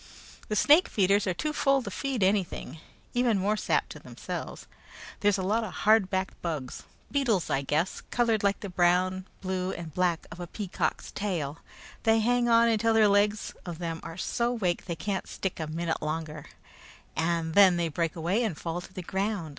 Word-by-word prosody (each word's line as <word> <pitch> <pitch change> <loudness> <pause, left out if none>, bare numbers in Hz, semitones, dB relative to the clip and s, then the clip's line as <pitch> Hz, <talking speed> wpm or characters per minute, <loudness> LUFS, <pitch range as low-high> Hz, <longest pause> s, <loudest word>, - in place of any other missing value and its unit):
The 215 - -2
snake 300 - +6
feeders 200 0 +2
are 185 - +1
too 305 - -2
full 275 -3 +2
to - - -6
feed 270 -7 -2
anything 185 -4 0 0.3
even 245 -3 +2
more 200 +3 +1
sap - - 0
to - - -9
themselves. - - -7 0.5
There's 205 -1 +3
a 190 - -2
lot 215 +5 +1
of 210 - -5
hard 215 -3 +5
backed 190 0 -2
bugs 150 -7 -4 0.3
beetles, 245 - +1
I 135 - +1
guess 155 +6 -1
colored 230 -3 +2
like 200 -1 +1
the 200 - -5
brown, 185 +1 +2
blue, 185 0 -2
and 165 -3 -7
black 175 -1 0
of 165 - -9
a 175 - -5
peacock's 195 0 -3
tail. 165 -8 -3 0.4
They 225 0 +4
hang 240 +2 +2
on 230 0 +6
until 225 0 +2
the 220 -1 +6
legs 205 +1 +2
of 175 -3 -6
them 165 -1 -4
are 165 0 -8
so 235 +5 0
wake 185 -8 -1
they 170 - -3
can't 190 +4 -3
stick 190 -3 -4
a 160 - -3
minute 165 +1 -2
longer, 155 -1 -4 0.7
and 165 0 0
then 190 -2 +7
they 170 -1 +1
break 165 +1 -2
away 175 +8 0
and 200 -9 -2
fall 170 +1 -4
to 175 - -12
the 185 -1 -7
ground. 190 -2 -2
190 Hz, 190 wpm, -28 LUFS, 170-215 Hz, 0.7 s, then